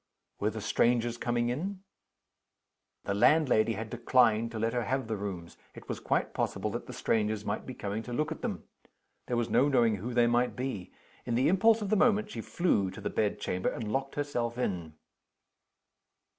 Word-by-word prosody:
Were 105 - +1
the 110 0 -6
strangers 120 +2 +2
coming 120 0 0
in? 185 +9 -3 1.2
The 100 - -1
landlady 115 -1 +4
had 110 +1 -6
declined 115 -2 +3
to 115 - -6
let 115 +1 0
her 120 -2 -1
have 135 -1 -1
the 110 - -1
rooms: 95 -5 -6 0.2
it - - -12
was - - -4
quite - - 0
possible - - -1
that - - -5
the - - -7
strangers 110 -1 0
might 105 +1 -3
be 130 - -6
coming 105 +1 -3
to 120 - -9
look 150 +6 -1
at - - -5
them. - - -3 0.6
There 120 - 0
was 120 -1 0
no 125 +4 +4
knowing 120 -6 +3
who 115 +6 -5
they 120 -1 +5
might 120 +1 +2
be. 125 -8 -4 0.4
In 120 - 0
the 125 - +3
impulse 220 +4 +4
of 200 - -3
the - - +5
moment 210 -1 +3
she - - -5
flew 105 - +1
to 95 - -9
the - - -3
bedchamber 105 -3 -1
and 110 -3 -4
locked 135 0 -2
herself 120 -5 -2
in. 85 -10 -3
120 Hz, 190 wpm, -30 LUFS, 105-130 Hz, 1.2 s, they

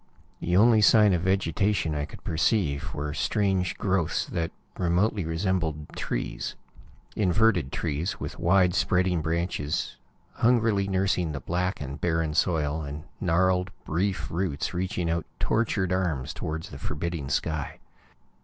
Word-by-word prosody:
The 90 +1 +1
only 110 +1 +6
sign 105 -1 +6
of 85 - +1
vegetation 95 -1 +1
I 75 -1 -1
could - - -12
perceive 80 -4 0
were 75 0 -3
strange 95 +2 0
growths 95 -6 0
that 85 -1 -2 0.3
remotely 90 +2 +1
resembled 80 -3 -1
trees - - -3 0.6
inverted 95 -6 +2
trees, 80 +6 -2
with - - -6
wide 90 0 +4
spreading 90 -2 +2
branches 80 -2 -2 0.4
hungrily 115 -4 +3
nursing 95 -4 +1
the 70 - -3
black 90 +5 -1
and 70 0 -6
barren 80 -2 0
soil, 80 -2 +1
and 75 +1 -6 0.2
gnarled, 90 +1 +2 0.2
brief 85 0 -1
roots 85 -4 -2
reaching 90 -1 -1
out 85 0 -1
tortured 100 -5 +1
arms 85 -8 -1
toward 80 +1 -4
the - - -9
forbidding 75 -2 -3
sky. 75 -3 -2
90 Hz, 130 wpm, -27 LUFS, 80-95 Hz, 0.6 s, only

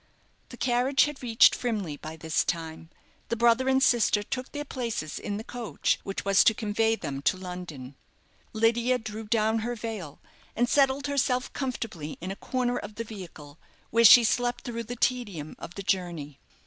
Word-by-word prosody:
The 245 - -10
carriage 250 +3 +3
had 295 -1 -3
reached 235 -3 +5
Frimley 210 -11 -2
by 155 +2 -8
this 160 0 0
time. 165 -1 -4 0.4
The 235 - 0
brother 235 +3 +3
and 265 0 +3
sister 225 -5 +3
took 255 +4 -5
their 290 0 -5
places 230 - -4
in 205 -1 -4
the 220 - -6
coach 235 -2 -2
which 195 - -5
was 195 -1 +5
to 220 - +5
convey 220 +1 +1
them 140 -9 -5
to 140 +6 +1
London. 180 -8 -8 0.6
Lydia 235 +3 +2
drew 220 -1 -7
down 220 0 +1
her 240 +2 -3
veil, 210 -10 -6 0.4
and 240 +1 +2
settled 275 +1 +2
herself 260 -3 0
comfortably 225 - -4
in 185 +3 -5
a - - -5
corner 245 +2 -1
of 205 +1 -9
the 230 - -4
vehicle, 170 -9 -11 0.3
where 230 +1 +4
she 235 +2 +10
slept 245 +1 0
through 235 -1 -5
the 245 +3 -6
tedium 210 - -2
of 175 - -9
the 200 - -6
journey. 170 -7 -2
225 Hz, 175 wpm, -27 LUFS, 180-245 Hz, 0.6 s, she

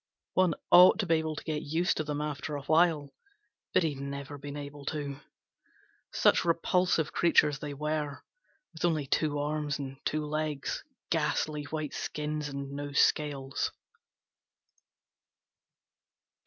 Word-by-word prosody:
One 185 -4 +3 0.2
ought 180 +1 +9
to 215 - 0
be 165 - +2
able 160 -1 -2
to - - -7
get 155 -2 -2
used 165 +4 0
to 155 - 0
them 150 0 -3
after 150 0 -3
a 140 - -5
while, 155 -3 +3 0.6
but - - +3
he'd 150 -4 -1
never 140 +1 -6
been 145 +1 -7
able 145 0 -8
to. 145 -2 -3 0.9
Such - - +4
repulsive 170 -1 +1
creatures 150 -4 +4
they 145 -1 -5
were, 150 -1 -3 0.5
with 160 - -8
only 160 -4 +2
two 145 +2 +1
arms 150 0 -1
and 135 -2 -6
two 155 0 -1
legs, 150 -1 -2 0.3
ghastly 150 -2 0
white 155 0 -4
skins 150 0 -3
and 140 0 -5
no 145 0 -5
scales. 140 -2 +1
150 Hz, 135 wpm, -30 LUFS, 145-155 Hz, 0.9 s, ought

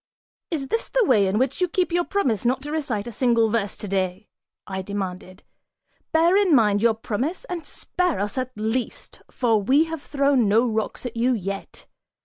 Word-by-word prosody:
"Is 280 -6 -3
this 455 - -1
the - - +2
way 210 - +4
in 190 +2 0
which 260 +7 0
you 360 - +3
keep 360 0 0
your 350 +1 +2
promise 260 - 0
not 255 +2 0
to 295 - -5
recite 260 -10 -2
a 240 - -6
single 230 -2 +2
verse 210 -3 -1
today?" 190 0 -3 0.4
I 190 -1 -4
demanded; 185 -1 -6 0.7
"bear 335 +3 +4
in 390 -6 +4
mind 210 -4 +3
your 230 -1 +3
promise 250 - -3
and 340 -8 -6
spare 360 - -1
us, 205 +1 -2
at 255 -1 -2
least, 220 +4 -3
for 225 -4 +1
we 270 +9 +4
have 325 -2 -5
thrown 280 -5 +2
no 220 +4 +4
rocks 220 +1 -2
at 240 - -5
you 245 +3 +2
yet. 195 -3 -5
240 Hz, 185 wpm, -23 LUFS, 205-300 Hz, 0.7 s, way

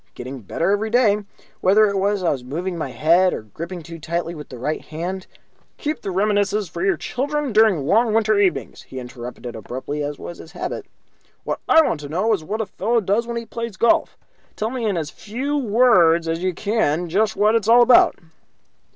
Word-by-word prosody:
Getting 130 +2 -7
better 165 - -1
every 210 +2 0
day. 215 -3 +3 0.3
Whether 205 +3 +5
it 200 -1 -1
was 200 +1 +1
that 180 - 0
I - - +4
was 130 -3 -3
moving 170 +8 -4
my 155 -5 -4
head 170 +9 +3
or - - -7
gripping 170 - -8
too 165 +1 -9
tightly 170 +2 -3
with 150 -3 -10
the 125 - -9
right 150 +6 -2
hand 180 +4 -5 0.2
" - - -39
"Keep 300 0 -3
the - - -4
reminiscences 205 +1 +1
for 170 - -6
your 190 -3 +2
grandchildren 285 - -2
during 215 -2 +5
the 155 - -4
long 220 - +3
winter 215 -1 +2
evenings," 175 - 0
he 130 - -9
interrupted, 125 0 -8
abruptly, 130 +7 -5
as 145 0 -3
was 175 - -9
his 160 - -12
habit. - - -5 0.6
"What - - -3
I 320 - +7
want 165 - -1
to 145 -1 -8
know 200 +8 +1
is 190 - -2
what 215 +7 -3
a - - -2
fellow 230 +5 0
does 215 +3 0
when 235 0 -3
he 230 - -4
plays 230 -2 -6
golf. 235 - +2 0.4
Tell 220 +2 -2
me 250 -3 -3
in 200 -4 0
as 155 -2 -3
few 260 +7 -4
words 205 - +4
as 165 +1 -2
you 185 -1 -1
can 185 -6 0
just 210 +5 +1
what 210 +1 +3
it's 225 -2 +1
all 240 +1 +7
about." 245 0 +6
190 Hz, 215 wpm, -21 LUFS, 160-220 Hz, 0.6 s, I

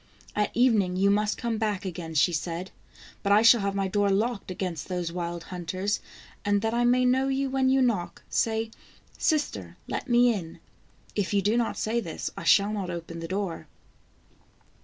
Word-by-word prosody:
" - - -23
At - - -7
evening 220 -7 +3
you 195 +2 +3
must 210 +1 +1
come 230 -2 -2
back 210 -4 -1
again," 165 -3 -5
she 165 +4 +4
said. 170 +3 -3 0.3
" - - -20
But 200 - 0
I 210 +2 +6
shall 230 -1 +7
have 200 0 -1
my 195 -1 0
door 205 +1 +1
locked 210 +2 0
against 180 -4 -4
those 180 -2 -2
wild 170 -1 -4
hunters, 185 +4 -2 0.4
and 205 0 +1
that 225 0 0
I 240 +1 +2
may 250 +1 +4
know 260 +2 +3
you 270 0 0
when 265 -1 +2
you 265 0 +4
knock, 210 -8 -1
say: 225 0 0 0.5
'Sister, 305 -2 -1
let - - -4
me 240 0 +5
in.' 170 -6 -6 0.6
If 205 0 0
you 200 - +2
do 210 +3 +2
not 235 -1 0
say 225 +2 0
this, 165 -8 -5
I - - -7
shall 200 +4 +5
not 195 -4 -3
open 170 -1 -6
the 165 - -5
door." 190 -2 -3
205 Hz, 195 wpm, -27 LUFS, 180-235 Hz, 0.6 s, shall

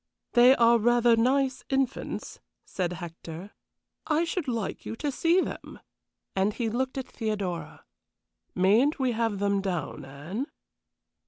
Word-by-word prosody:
"They 245 +2 +7
are 235 -1 +5
rather 240 +1 +4
nice 260 +3 +1
infants," 270 -1 -2 0.3
said 180 -2 -2
Hector. 170 +2 -8 0.6
"I 315 +1 +2
should 340 -2 -2
like 230 -5 -3
you - - -5
to 290 +5 -2
see 335 +6 +3
them," - - -6 0.6
and 195 +2 +2
he 235 -3 -1
looked 255 +4 -2
at 265 - -4
Theodora. 195 -8 -4 0.7
"Mayn't 215 +11 +4
we 260 -3 +1
have 225 -2 0
them 200 0 +1
down, 170 -6 -3
Anne?" 155 - -5
230 Hz, 135 wpm, -27 LUFS, 190-260 Hz, 0.7 s, They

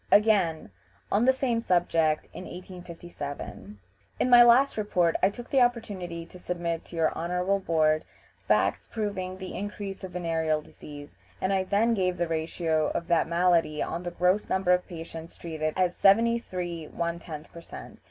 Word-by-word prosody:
" - - -33
Again, 200 -7 +3 0.4
on 210 +4 +3
the 260 - +7
same 255 -3 0
subject 165 -5 +1
in 185 - -8
1857: 170 - -8 0.4
"In - - +2
my 240 0 +10
last 240 +4 +6
report 180 -6 +1
I - - +5
took 240 +4 -10
the 270 - +4
opportunity 200 -9 -1
to 180 - -14
submit 170 -2 -3
to - - -11
your 160 -1 +1
Honorable 180 +3 0
Board 155 -4 +2 0.4
facts - - +2
proving 195 -4 -4
the 185 -1 -7
increase 200 -1 -6
of 185 -2 -7
venereal 165 -3 0
disease, 145 -1 -12 0.2
and 190 +1 0
I 190 -1 +1
then 215 +5 +2
gave 185 -4 0
the 175 - 0
ratio 160 -1 0
of 170 - -3
that 170 -2 +3
malady 170 -3 +2
on 170 - -4
the 175 - -4
gross 180 +4 +1
number 190 -1 +1
of 180 0 +2
patients 165 -1 -9
treated 155 -2 -3
as 180 -1 +1
73 195 -6 +2
1/10 170 -2 -4
per 170 - -10
cent. 65 - -11
180 Hz, 165 wpm, -27 LUFS, 165-200 Hz, 0.4 s, my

